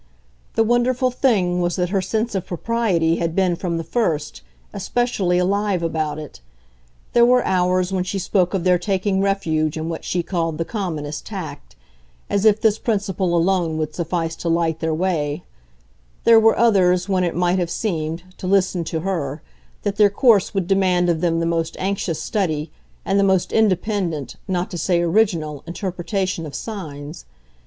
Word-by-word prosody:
The 225 - +4
wonderful 240 +2 +2
thing 195 -9 +1
was 175 -1 0
that 180 -1 -1
her 195 0 +1
sense 220 +5 -2
of 190 -2 -3
propriety 175 -4 0
had 165 -1 -2
been, 185 -2 +2
from 170 -1 -3
the 165 - -3
first, 160 - -1 0.3
especially 205 -8 0
alive 195 0 +1
about 155 -2 -1
it. 150 - -9 0.7
There 240 - +5
were 250 +1 +4
hours 185 0 +1
when 185 -1 +1
she 185 +2 -3
spoke 185 0 +1
of 185 - -1
their 180 -1 +3
taking 190 +1 0
refuge 160 -6 0
in 160 +1 -3
what 165 - -5
she 175 -1 -1
called 165 -3 -2
the 165 - -2
commonest 155 -9 -4
tact 155 - -7 0.6
as 200 +1 +1
if 215 -1 +5
this 220 -1 +2
principle 195 -5 0
alone 170 -2 +1
would 155 -1 -2
suffice 165 -1 -2
to 170 - -3
light 165 -1 +1
their 160 -1 -1
way; 155 -3 -1 0.8
there 230 -1 +7
were 225 0 +4
others 185 -5 +3
when 190 -2 +1
it 175 - -1
might 175 +1 +1
have 175 -2 -1
seemed, 165 -4 -2 0.2
to 185 - -5
listen 185 -2 +2
to 160 0 -3
her, 155 -6 -3 0.4
that 205 0 -2
their 205 -1 +6
course 205 -2 +3
would 195 -4 -1
demand 180 -2 +2
of 165 -2 0
them 165 -2 +1
the 165 - 0
most 165 -1 -1
anxious 185 -4 -2
study 160 -5 -2 0.3
and 195 +1 +2
the - - +4
most 190 -2 +2
independent, 190 - 0
not 180 -2 -2
to 175 - -4
say 175 0 +1
original, 170 -5 +1
interpretation 185 -1 -3
of 145 - -9
signs. 155 -8 -7
180 Hz, 175 wpm, -21 LUFS, 165-200 Hz, 0.8 s, there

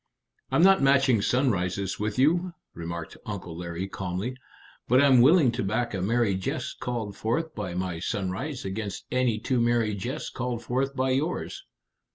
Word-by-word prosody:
"I'm 165 - +3
not 195 0 +6
matching 135 -4 +4
sunrises 100 -6 0
with 105 0 -2
you," 170 +7 +2 0.2
remarked 85 0 -6
Uncle 95 -5 -6
Larry 85 +2 -4
calmly; 95 +6 -4 0.5
"but 125 +2 +5
I'm 135 -3 +6
willing 145 -1 +6
to 120 0 -2
back 110 +4 -1
a 95 - -2
merry 115 +1 +2
jest 95 0 -3
called 115 -5 -3
forth 155 +11 -1
by 95 -5 -5
my 90 -2 -2
sunrise 100 - -3
against 100 +1 -4
any 125 -3 +2
two 125 +3 0
merry 115 -2 +2
jests 120 +10 -4
called 120 -2 -3
forth 135 +2 -1
by 130 0 +1
yours." 150 +7 -2
115 Hz, 160 wpm, -27 LUFS, 95-130 Hz, 0.5 s, not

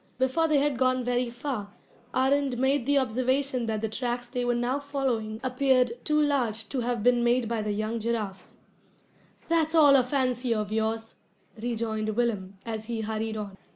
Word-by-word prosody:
Before 260 +6 +2
they 305 -2 +3
had 280 -2 +1
gone 255 -1 +2
very 245 0 0
far, 235 -5 -5 0.4
Arend 265 0 +1
made 265 0 +1
the 285 0 +4
observation 255 0 0
that 215 -1 -1
the 220 - 0
tracks 240 +2 -3
they 250 0 -3
were 245 0 +1
now 245 +3 0
following 260 -7 -2
appeared 255 -1 +2
too 300 -1 +2
large 245 -7 0
to 270 - -2
have 240 -2 -1
been 245 0 +4
made 240 0 +2
by 230 -1 -1
the 210 0 -2
young 215 +2 -2
giraffes. 210 -5 -3 0.9
"That's 330 -1 +1
all 290 -3 +7
a 265 - +6
fancy 255 -2 0
of 210 -1 -2
yours," 220 +1 -2 0.4
rejoined 220 -2 -2
Willem, 205 -5 -1
as 220 -1 -4
he 230 -1 -3
hurried 220 0 -3
on. 200 -2 -6
245 Hz, 175 wpm, -27 LUFS, 220-265 Hz, 0.9 s, all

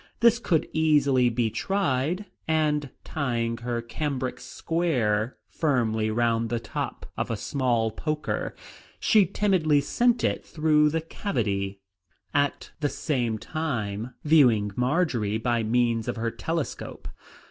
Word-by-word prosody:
This 235 0 +5
could 165 -9 +1
easily 140 -5 +4
be 115 -1 0
tried, 175 - 0 0.2
and 150 -3 +1
tying 120 -5 -1
her 120 0 -3
cambric 130 +1 -3
square 125 -10 -1
firmly 115 -8 0
round 115 0 +1
the 120 - -1
top - - -5
of - - -2
a - - -1
small 120 -5 0
poker, 155 +6 -3 0.4
she 210 -4 +4
timidly 170 -7 +2
sent 235 - +2
it - - 0
through 150 -1 +3
the 160 +2 -1
cavity, 100 - -2 0.5
at 145 -1 0
the 145 -2 +1
same 120 -9 -1
time 115 -6 -3
viewing 125 -10 +4
Marjory 125 - +1
by 120 +1 0
means 115 0 +1
of - - -1
her 115 0 -2
telescope. 160 +6 -4
130 Hz, 125 wpm, -26 LUFS, 115-155 Hz, 0.5 s, This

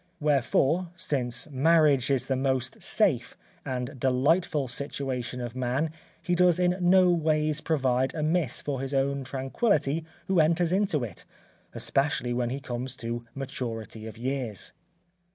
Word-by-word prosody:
Wherefore, 150 +4 +2
since 125 -5 -1
marriage 145 -1 +4
is 135 -3 +1
the 135 - 0
most 130 -1 -1
safe, 165 - +2 0.3
and 130 0 -4
delightful 140 +3 +2
situation 125 -1 -4
of 120 -1 -5
man 130 +5 -1 0.3
he 175 - -2
does 175 -1 +4
in 180 0 +2
no 180 0 +5
ways 155 -2 +1
provide 130 -4 +1
amiss 155 -3 0
for 135 -3 -2
his 135 +1 -3
own 140 0 0
tranquillity 140 - 0 0.2
who 190 -2 +2
enters 165 +2 +3
into 190 -8 +1
it, 110 -7 -6 0.5
especially 135 -3 0
when 120 -1 0
he 135 +3 -3
comes 125 0 -5
to 120 -1 -5
maturity 115 -5 -5
of 110 - -9
years." 125 -4 -3
135 Hz, 135 wpm, -27 LUFS, 125-160 Hz, 0.5 s, no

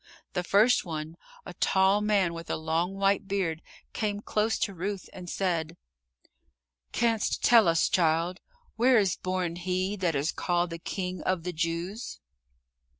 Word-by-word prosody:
The 180 - -1
first 210 +7 +4
one, 160 -2 -5 0.3
a 180 - -8
tall 190 +3 +3
man 200 -5 +2
with 165 0 -8
a - - 0
long 165 +4 -1
white 195 0 +1
beard, 180 -5 -1 0.3
came 205 -2 -2
close 215 0 0
to 200 - -1
Ruth 190 +2 -4
and 180 -2 -8
said, 170 -3 -1 1.1
"Canst 230 -2 0
tell 230 -5 +6
us, 165 0 +3
child, 170 +1 +1 0.4
where 250 +2 +5
is 195 -4 +2
born 185 -2 -2
he 185 +2 -1
that 175 -5 0
is 140 +4 0
called 175 -1 -1
the 165 - -5
King 180 +1 -4
of 185 -3 -1
the 180 0 -4
Jews?" 170 +7 -3
185 Hz, 150 wpm, -28 LUFS, 170-200 Hz, 1.1 s, tell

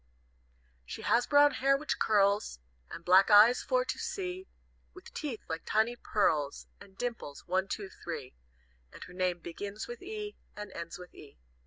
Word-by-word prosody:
"She - - -8
has 240 - +2
brown 290 0 +6
hair 275 0 +2
which 305 +2 -3
curls, 205 - +2 0.3
And 170 - -9
black 190 +3 +6
eyes 215 +4 +7
for - - +1
to - - -4
see 375 -1 -4 0.5
With, 370 - -13
teeth 275 -8 -5
like 160 0 -4
tiny 220 +3 +1
pearls, 155 -11 0
And 195 -1 -16
dimples, 235 -12 -5
one, 185 +2 0
two 200 -2 -5
three, 150 -7 -6 0.6
And - - -10
her 180 - -12
name 180 -1 -1
begins 200 +6 -6
with 240 0 -8
E, 420 +1 -6 0.2
and 210 0 -7
ends 170 0 -7
with 180 0 -12
E. 145 - -14
210 Hz, 165 wpm, -31 LUFS, 180-275 Hz, 0.6 s, eyes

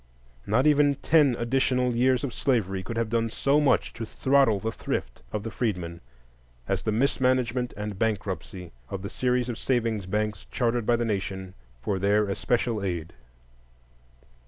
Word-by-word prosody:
Not 115 +7 +2
even 145 -1 +4
ten 145 -3 +3
additional 125 0 +1
years 130 +2 +3
of 135 -4 -3
slavery 95 -8 0
could 115 +5 -6
have 115 -1 -1
done 115 -1 +1
so 140 +6 +2
much 145 - +2
to 115 - -6
throttle 130 -2 +2
the 110 +3 -2
thrift - - -4
of 105 - -3
the 115 - -5
freedmen 90 -7 -3 0.7
as - - 0
the 110 - -1
mismanagement 125 0 +1
and 105 -2 -5
bankruptcy 95 -5 -3 0.2
of 95 0 -5
the 100 - -5
series 125 -1 0
of 120 -2 -4
savings 115 -6 0
banks 105 0 -2
chartered 120 -2 0
by 120 - +4
the 120 0 -1
Nation 95 -3 -3 0.3
for 95 +6 -1
their 105 +2 +3
especial 115 +1 0
aid. 85 -4 -3
115 Hz, 160 wpm, -26 LUFS, 100-125 Hz, 0.7 s, even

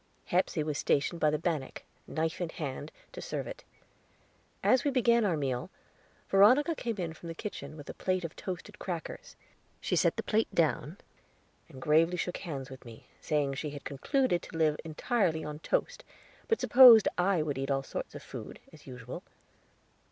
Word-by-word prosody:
Hepsey 175 -3 +1
was 150 -1 -2
stationed 160 +4 +1
by 155 - +5
the 150 - +1
bannock, 155 -4 -3 0.2
knife 160 +2 -2
in 175 - -1
hand, 145 -1 -5 0.2
to - - -8
serve - - -4
it. - - -8 1.0
As 255 -1 +4
we 290 - +2
began 235 -3 +3
our 175 -5 +1
meal, 130 -4 -2 0.6
Veronica 250 - +5
came 235 -7 -3
in 170 -4 -3
from 170 - -11
the 165 - -6
kitchen, 155 -7 -7
with 145 - -10
a - - -6
plate 185 -1 -1
of 165 - -7
toasted 180 -2 -7
crackers. 185 - -6 0.4
She - - -1
set - - +2
the - - -2
plate 220 +1 +1
down, 155 +1 +1 0.7
and 135 -5 -11
gravely 160 +5 +3
shook 175 +1 -2
hands 140 -7 -6
with 130 - -10
me, 115 -3 -13 0.2
saying 145 -3 0
she 150 +2 -4
had 145 -1 -8
concluded 175 - 0
to - - -9
live 155 -2 +2
entirely 165 +1 0
on 150 0 -6
toast, - - -1 0.4
but 450 -2 +1
supposed 240 -4 +9
I 180 -2 +2
would 145 -3 -3
eat 135 +1 -3
all 135 -1 +1
sorts - - -6
of - - -8
food, - - -8 0.2
as 150 - -16
usual. 125 -2 -8
165 Hz, 180 wpm, -30 LUFS, 145-200 Hz, 1.0 s, supposed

